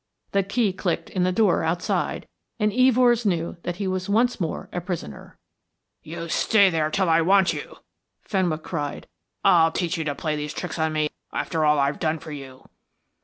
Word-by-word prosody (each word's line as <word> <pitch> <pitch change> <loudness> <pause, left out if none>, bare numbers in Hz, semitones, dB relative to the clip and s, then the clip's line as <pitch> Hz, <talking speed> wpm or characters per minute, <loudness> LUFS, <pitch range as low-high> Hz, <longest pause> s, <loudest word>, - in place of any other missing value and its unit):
The 200 - +3
key 200 +1 0
clicked 170 -3 -2
in 185 - -1
the 185 - +2
door 200 -3 +2
outside, 170 +2 -1 0.3
and 210 -1 +2
Evors 250 -1 +4
knew 175 -4 -1
that 175 - -4
he 195 +1 -3
was 185 0 -2
once 235 +4 +2
more 165 - -3
a 180 - -2
prisoner. 170 - -7 0.6
"You 170 +2 -7
stay 200 +3 +4
there 155 -2 0
till 190 +3 0
I 165 0 +4
want 190 +2 +4
you," - - -7 0.5
Fenwick 175 -6 -1
cried. 145 -4 -4 0.4
"I'll 165 -1 +5
teach 175 0 -2
you - - -1
to 145 -2 -2
play 155 0 -2
these 150 0 -5
tricks 175 -2 -5
on 160 0 +1
me 155 -1 0 0.2
after 160 -3 -1
all 150 0 +4
I 140 - +3
have 140 +1 -2
done 160 0 0
for 155 0 -10
you." 135 -3 -10
170 Hz, 190 wpm, -24 LUFS, 155-195 Hz, 0.6 s, I'll